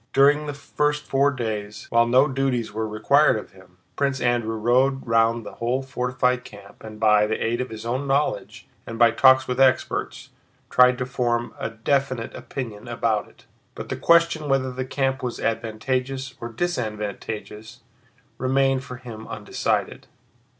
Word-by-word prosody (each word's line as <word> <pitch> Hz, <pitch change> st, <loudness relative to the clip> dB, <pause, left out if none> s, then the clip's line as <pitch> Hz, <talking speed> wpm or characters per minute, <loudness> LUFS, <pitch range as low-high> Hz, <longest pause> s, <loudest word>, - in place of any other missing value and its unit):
During 145 Hz, +2 st, +4 dB
the 145 Hz, -, -3 dB
first 150 Hz, +1 st, -1 dB
four 140 Hz, +1 st, +2 dB
days, 110 Hz, -5 st, -4 dB
while 115 Hz, 0 st, +4 dB
no 130 Hz, +4 st, +5 dB
duties 130 Hz, -5 st, -1 dB
were 110 Hz, +1 st, -2 dB
required 110 Hz, +6 st, +3 dB
of 105 Hz, -, -8 dB
him, 95 Hz, -1 st, -19 dB, 0.2 s
Prince 140 Hz, -2 st, 0 dB
Andrew 120 Hz, -2 st, 0 dB
rode 130 Hz, +5 st, +2 dB
round 115 Hz, -1 st, +2 dB
the -, -, -8 dB
whole 125 Hz, +3 st, 0 dB
fortified 125 Hz, -1 st, -1 dB
camp 100 Hz, -1 st, -14 dB
and, 110 Hz, -1 st, -9 dB
by 105 Hz, -1 st, +4 dB
the 110 Hz, -, -1 dB
aid 120 Hz, +2 st, -1 dB
of 125 Hz, -, -4 dB
his 110 Hz, 0 st, -8 dB
own 130 Hz, +4 st, -2 dB
knowledge 140 Hz, +2 st, -1 dB, 0.2 s
and 115 Hz, -, -6 dB
by 115 Hz, 0 st, +6 dB
talks 130 Hz, +2 st, +5 dB
with 125 Hz, +1 st, -2 dB
experts, 130 Hz, -1 st, +1 dB, 0.4 s
tried 125 Hz, 0 st, +5 dB
to 125 Hz, -, -2 dB
form 120 Hz, -1 st, -1 dB
a -, -, -2 dB
definite 130 Hz, +1 st, -1 dB
opinion 115 Hz, -4 st, -7 dB
about 115 Hz, -3 st, -1 dB
it. -, -, -22 dB, 0.3 s
But -, -, -7 dB
the -, -, -2 dB
question 170 Hz, -3 st, +3 dB
whether 135 Hz, -1 st, +1 dB
the 130 Hz, 0 st, -4 dB
camp 135 Hz, 0 st, -1 dB
was 125 Hz, -2 st, -4 dB
advantageous 130 Hz, +4 st, -2 dB
or 115 Hz, -, -5 dB
disadvantageous 110 Hz, -, -4 dB, 0.6 s
remained 135 Hz, 0 st, +1 dB
for 125 Hz, -, -8 dB
him 115 Hz, -3 st, -10 dB
undecided. -, -, -2 dB
125 Hz, 160 wpm, -23 LUFS, 110-135 Hz, 0.6 s, by